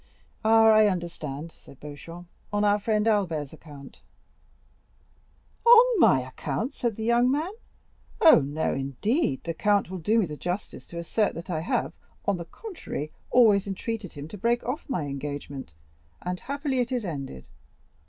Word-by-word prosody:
"Ah, 225 +1 +6
I 215 -1 +6
understand," 165 -5 -4
said 135 - -17
Beauchamp, 165 +4 -10 0.3
"on 205 0 +1
our 205 0 +3
friend 215 +1 +1
Albert's 165 -10 0
account." 145 -3 -13 1.6
"On 475 -1 +7
my 130 - +5
account?" 135 - -4
said 235 -6 -2
the 220 - -5
young 235 +2 +3
man; 305 +7 0 0.7
"oh, 320 - +8
no, 145 +3 -1
indeed, 135 - -1
the 165 - -3
count 200 +1 +1
will 185 - -4
do 210 +8 +2
me 220 - +3
the 150 -3 -6
justice 180 +6 -5
to 170 - -9
assert 200 +5 0
that 170 +2 -6
I 160 - -1
have, 160 - -1 0.3
on 200 -2 +1
the 170 - -6
contrary, 325 - -7 0.2
always 210 -5 +5
entreated 205 0 -4
him 145 0 -8
to 210 - -9
break 235 +3 +1
off 280 +5 -4
my 210 - -1
engagement, 140 - -6 0.5
and 180 0 -3
happily 280 -1 -2
it 245 +1 0
is 245 -4 -1
ended. 135 - -6
190 Hz, 160 wpm, -26 LUFS, 150-230 Hz, 1.6 s, oh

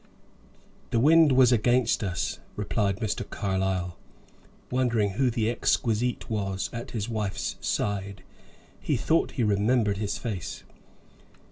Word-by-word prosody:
"The 115 - +1
wind 155 +3 +6
was 130 -1 +6
against 120 0 +2
us," 90 -3 -2 0.2
replied 100 -1 -1
Mr. 110 -1 -2
Carlyle, 95 -3 -2 0.7
wondering 120 -5 +1
who 125 +6 +1
the 115 -2 0
exquisite 120 0 0
was 95 -3 -2
at 115 0 -6
his 110 -2 -3
wife's 110 -4 -3
side. 100 -2 -2 0.6
He - - 0
thought 165 - +1
he 125 - 0
remembered 105 0 +2
his 105 -1 -2
face. 105 -8 -5
110 Hz, 120 wpm, -27 LUFS, 100-120 Hz, 0.7 s, wind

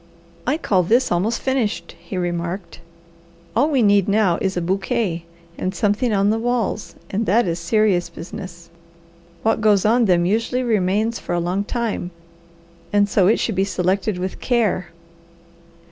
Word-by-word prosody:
"I 290 +4 +2
call 195 - +2
this 235 +9 +2
almost 200 +7 +1
finished," 235 -10 -1
he 185 +2 -6
remarked. 175 +1 -3 0.8
"All 280 +7 +3
we 270 -6 +2
need 200 -2 +4
now 200 -4 +2
is 190 -1 -1
a - - +2
bouquet 190 -1 -1 0.3
and 185 +1 -2
something 210 +5 +1
on 200 0 +2
the 225 - 0
walls, 235 -3 -2 0.2
and 215 +3 -1
that 230 +4 +3
is 170 0 -1
serious 190 0 +1
business. 170 0 -9 0.7
What 225 0 +1
goes 210 -2 +3
on 235 +2 +4
them 175 -3 +3
usually 230 +6 0
remains 215 0 +1
for - - -3
a - - +1
long 180 +4 -1
time, 225 -5 -3 0.8
and 205 0 +3
so 195 -2 +3
it 220 - +4
should 225 - 0
be 190 0 +1
selected 190 +1 0
with 185 +1 -5
care. 225 -7 +1
200 Hz, 160 wpm, -21 LUFS, 180-225 Hz, 0.8 s, need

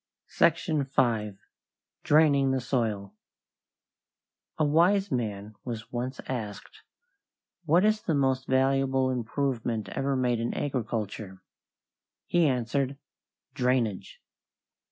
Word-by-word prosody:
SECTION 155 -5 +2
V. 115 -6 0 0.7
DRAINING 145 -3 +4
THE 130 0 +1
SOIL 110 -6 -2 1.4
A 155 - +2
wise 180 +6 +3
man 105 -4 -3
was 115 -1 -6
once 125 +2 -4
asked, 110 -6 -6 0.8
"What 170 +5 +4
is 215 0 +2
the 165 - 0
most 130 -2 +1
valuable 135 0 +2
improvement 120 -2 -2
ever 135 0 -1
made 125 -2 +1
in 115 - -2
agriculture?" 110 -7 -4 0.8
He 175 -2 +3
answered, 130 +2 -1 0.6
"Drainage." 125 -7 -1
130 Hz, 95 wpm, -28 LUFS, 115-140 Hz, 1.4 s, DRAINING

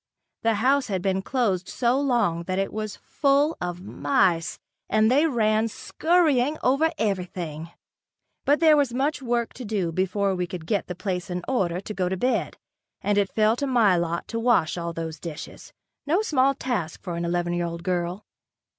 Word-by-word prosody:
The 225 -1 +2
house 260 +5 +2
had 190 -4 -2
been 190 -1 +1
closed 195 -6 -1
so 245 +2 +1
long 235 -11 +1
that 185 +1 -2
it 195 0 -1
was 215 -1 -4
full 285 +2 +1
of 175 0 -4
mice, 185 - +1 0.3
and 215 +2 +3
they 290 +5 +4
ran 220 -4 +2
scurrying 305 +1 +1
over 275 +6 +3
everything. 175 - -3 0.7
But 290 +3 +2
there 315 -2 +7
was 275 -5 +1
much 275 +1 0
work 240 -2 -1
to 255 - -8
do 200 -6 -1
before 190 +3 0
we 180 -1 -2
could 175 -3 -7
get 205 +3 -1
the 180 - -5
place 180 -1 -3
in 180 0 -3
order 180 -9 0
to 205 +2 -6
go 185 -3 -1
to 190 - -2
bed, 255 +7 0 0.5
and 205 +1 +1
it 200 -1 +1
fell 215 +1 +3
to 280 - -1
my 230 -8 +4
lot 170 0 -2
to 230 - -2
wash 230 -9 +2
all 170 -1 -3
those 165 -2 -5
dishes, 160 -2 -8 0.4
no 350 +8 +2
small 275 -7 +2
task 235 - -3
for 175 -3 -4
an 170 - -3
eleven 175 0 -1
year 175 0 -1
old 170 0 -6
girl. 180 +2 -2
205 Hz, 185 wpm, -25 LUFS, 180-255 Hz, 0.7 s, there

